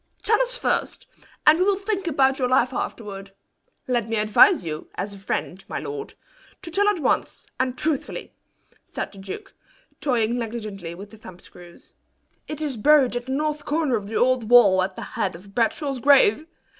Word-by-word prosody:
"Tell 440 +2 +3
us - - -1
first, - - -1 0.4
and 310 +2 +6
we - - +4
will 400 +1 +3
think 395 -2 -3
about 270 -3 +2
your 250 -1 +1
life 255 0 +2
afterward. 195 -5 -6 0.5
Let 240 -3 0
me 225 - -1
advise 220 - +5
you 155 -1 -6
as 200 +1 -4
a 200 - -11
friend, 190 -1 -4
my - - -4
lord, 430 0 -6 0.5
to 335 - -7
tell 405 +4 +2
at 415 - 0
once, 300 - -1
and 260 -1 -1
truthfully," 305 -3 -3 0.5
said - - -6
the 200 - -13
duke, 195 -1 -8 0.5
toying 240 -3 0
negligently 215 -7 -6
with 200 +3 -11
the 220 - -13
thumb 210 -5 -12
screws. 175 -1 -16 0.5
"It 305 0 -5
is 280 -5 -3
buried 275 0 +4
at 245 +1 -4
the - - -4
north 300 +1 -1
corner 300 -4 0
of 205 -3 -4
the 220 - -6
old 250 -2 +2
wall 205 -7 +7
at 185 0 -2
the - - -7
head 190 -3 -3
of 195 +4 -14
Bradshaw's 255 +4 0
grave. 280 +1 +4
245 Hz, 185 wpm, -23 LUFS, 205-305 Hz, 0.5 s, wall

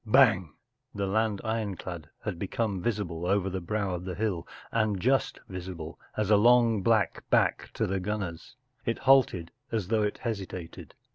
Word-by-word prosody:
“ - - -38
Bang! 95 - +5 0.2
” 130 -1 -33
The 100 -1 -1
land 105 +1 +1
ironclad 95 -8 -3
had 100 -6 -3
become 100 -1 -1
visible 90 -6 -2
over 95 0 +1
the 95 0 -3
brow 100 +1 -1
of 90 0 -4
the 90 -1 -4
hill, 95 -4 -1 0.2
and 110 -4 +1
just 130 +4 +1
visible 90 -3 -7 0.2
as 110 -1 +1
a 105 - +7
long 115 -1 +5
black 110 0 +2
back - - +2
to - - +1
the 95 +1 -1
gunners. 95 0 -4 0.3
It 115 - -1
halted, 110 -11 +4 0.2
as 105 -5 -1
though 110 -1 +3
it 105 -1 0
hesitated. 95 -7 -6
100 Hz, 170 wpm, -29 LUFS, 90-110 Hz, 0.3 s, a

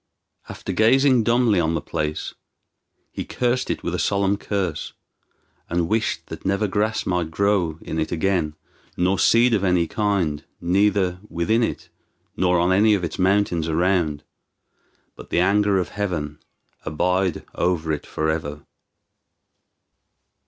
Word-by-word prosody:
After - - -5
gazing 130 +3 +4
dumbly 115 -4 +3
on 80 -1 +1
the - - 0
place 75 0 -3 0.8
he - - -5
cursed 125 0 -1
it - - -3
with - - -2
a - - -1
solemn 100 0 +1
curse, 95 -6 -3 0.8
and 85 -1 0
wished 110 +4 -1
that - - -8
never 100 +2 0
grass 105 +3 -1
might 90 -3 -1
grow 90 -2 +1
in 80 - -4
it 80 - -2
again, 85 -3 0 0.4
nor 95 +2 +1
seed 120 +1 +4
of 100 -3 +1
any 90 -3 +2
kind, 95 -7 -1 0.2
neither 95 0 +1
within 110 +8 +1
it 115 - -3 0.5
nor 90 -1 +2
on 90 +2 +2
any 105 +3 +4
of 95 - -3
its 85 +1 -4
mountains 95 -3 +2
around, 85 -3 +1 0.9
but - - -12
the - - +1
anger 100 +2 +3
of 90 - -1
Heaven 85 -8 -3 0.4
abide 90 +3 0
over 85 -3 0
it 75 - -4
forever. 80 -2 -3
90 Hz, 140 wpm, -22 LUFS, 80-105 Hz, 0.9 s, gazing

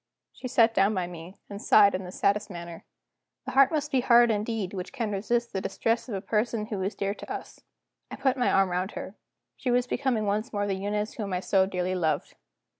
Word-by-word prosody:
She 255 - -7
sat 230 -2 +4
down 200 +1 +3
by 185 -2 0
me, 175 +2 -10
and 200 0 -8
sighed 200 -2 +6
in 185 0 -3
the 180 - -8
saddest 205 +3 0
manner. 170 -2 -8 0.6
The - - -4
heart 275 0 +5
must 300 -2 -1
be 265 - +3
hard 240 -1 +5
indeed 210 -2 -2
which 185 -2 -5
can 235 -6 -3
resist 235 +4 -1
the 190 - -2
distress 230 +5 -1
of 210 - -3
a 190 - -3
person 215 +1 -1
who 210 -4 -4
is 195 +3 -2
dear 200 0 -1
to - - -10
us. - - -7 0.5
I - - -6
put 265 -2 +1
my 250 -2 +1
arm 195 -1 +3
round 185 +3 -2
her; 190 - -7 0.4
she 255 - -3
was 245 0 +2
becoming 250 -4 -1
once 210 +4 -1
more 205 -1 -1
the 200 - -1
Eunice 205 +2 -2
whom 205 -4 -4
I 180 - 0
so 190 0 +2
dearly 185 -1 -2
loved. 165 -4 -1
205 Hz, 225 wpm, -27 LUFS, 190-235 Hz, 0.6 s, sighed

